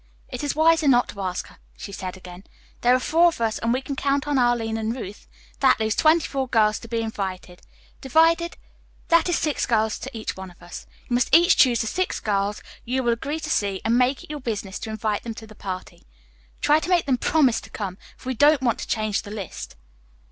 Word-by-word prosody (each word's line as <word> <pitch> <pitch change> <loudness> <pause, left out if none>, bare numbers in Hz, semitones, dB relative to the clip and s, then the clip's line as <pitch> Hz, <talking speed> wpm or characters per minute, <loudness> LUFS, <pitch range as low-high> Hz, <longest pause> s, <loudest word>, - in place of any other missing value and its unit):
"It 250 +1 -6
is 290 - -1
wiser 320 0 +4
not 245 -2 +4
to 200 - -7
ask 185 -1 -3
her," - - -18 0.2
she - - -8
said 185 -1 -6
again. 180 0 -11 0.4
"There 245 +1 +5
are - - +2
four 330 +6 +4
of 335 - -1
us, 225 -2 0
and 230 - 0
we 255 +2 0
can 280 - -4
count 280 +1 0
on 290 -2 +1
Arline 240 -2 +1
and 225 +1 -2
Ruth; 205 -5 -8 0.3
that - - +4
leaves 220 -1 +1
twenty 315 +1 +4
four 270 -2 -2
girls 215 -3 +2
to 230 - -11
be 230 0 -2
invited. 190 -4 -5 0.4
Divided, 330 +5 +3 0.5
that 335 +1 +4
is 350 - +2
six 300 -2 -1
girls 220 -2 +1
to 260 -3 -7
each 215 - -4
one 190 0 -8
of 175 - -19
us. 175 0 -10 0.2
You - - -3
must 245 0 +2
each 345 +3 +6
choose 245 -4 +4
the - - -2
six 370 +11 -1
girls 205 -1 -1 0.2
you 260 +2 -1
will 240 -1 +2
agree 285 +7 -4
to 310 - -5
see 200 -6 0
and 225 +1 +3
make 255 +2 +2
it - - -10
your 300 - -5
business 205 -5 -4
to - - -6
invite 215 -1 -2
them 230 -2 -6
to 220 - -9
the 215 - -14
party. 185 - -8 0.5
Try 300 +1 +4
to 335 - -5
make 355 -2 +3
them 260 -3 +1
promise 265 -8 +2
to - - -13
come, 195 -3 -5 0.2
for 260 - -8
we - - 0
don't 290 +2 +4
want 235 -3 +1
to - - -5
change 215 -2 -1
the 205 - -11
list." 205 -4 -7
235 Hz, 235 wpm, -24 LUFS, 210-280 Hz, 0.5 s, each